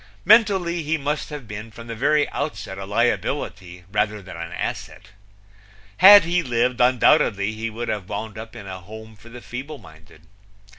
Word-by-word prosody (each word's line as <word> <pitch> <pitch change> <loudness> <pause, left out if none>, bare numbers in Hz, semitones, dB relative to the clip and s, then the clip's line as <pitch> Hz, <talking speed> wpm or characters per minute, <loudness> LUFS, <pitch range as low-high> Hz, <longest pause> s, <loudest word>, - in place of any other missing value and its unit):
Mentally 190 -6 +4
he 160 +1 -1
must 150 +1 -3
have 145 -6 -8
been 105 +2 -7
from 115 +1 -12
the 115 - -6
very 145 +6 +2
outset 140 -9 -5
a 95 - -6
liability 95 -4 -2
rather 105 0 0
than 95 -3 -11
an 85 0 -7
asset. - - -6 0.9
Had 205 - +9
he 175 +1 0
lived, 125 -3 0
undoubtedly 110 -4 +3
he 110 +1 -4
would 115 +2 -6
have 105 -4 -4
wound 105 +1 -5
up 110 +1 -9
in 110 -4 -9
a 95 -1 -7
home 110 +4 -12
for 105 +3 -16
the 120 +1 -11
feeble 135 +6 -7
minded. 80 - -18
115 Hz, 170 wpm, -22 LUFS, 105-145 Hz, 0.9 s, Had